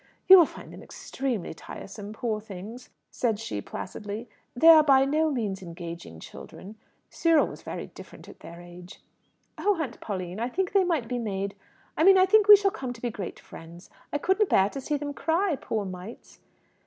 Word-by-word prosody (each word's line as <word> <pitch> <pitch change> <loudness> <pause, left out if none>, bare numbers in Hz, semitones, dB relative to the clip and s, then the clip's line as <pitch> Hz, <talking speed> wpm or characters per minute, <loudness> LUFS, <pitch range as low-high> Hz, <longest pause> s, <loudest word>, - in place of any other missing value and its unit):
"You 380 0 +10
will 335 - +5
find - - -12
them - - -11
extremely 250 -11 -5
tiresome, 200 +5 -10
poor 220 -1 -3
things!" 215 +4 -10 0.2
said 225 -4 -1
she 105 - -5
placidly. 210 - -7 0.3
"They 320 +7 +6
are 320 -1 +9
by 270 -2 +5
no 310 +3 +1
means 215 -8 -3
engaging 170 - -9
children. 200 - -11 0.4
Cyril 330 -3 +3
was - - -9
very - - -6
different - - -14
at - - -14
their 170 +1 -11
age." 175 +1 -13 0.6
"Oh, 405 -4 +1
Aunt 275 -7 -5
Pauline! 185 -2 -5
I 240 +2 -2
think 370 +6 -2
they 395 -1 +4
might 325 -10 -1
be 245 +1 -3
made 200 -3 -3 0.4
I - - +1
mean 385 +2 +7
I 370 - +6
think 415 +2 +4
we 415 - +12
shall 395 -1 +1
come 255 -7 -6
to 230 - -15
be 240 - -2
great 195 -4 -7
friends. 170 +2 -13 0.2
I - - 0
couldn't 380 +6 +1
bear 195 +1 +3
to 275 - -6
see 295 +2 -2
them 290 0 -5
cry, 335 +3 0
poor 220 -5 -4
mites!" 185 +4 -10
235 Hz, 190 wpm, -26 LUFS, 195-315 Hz, 0.6 s, we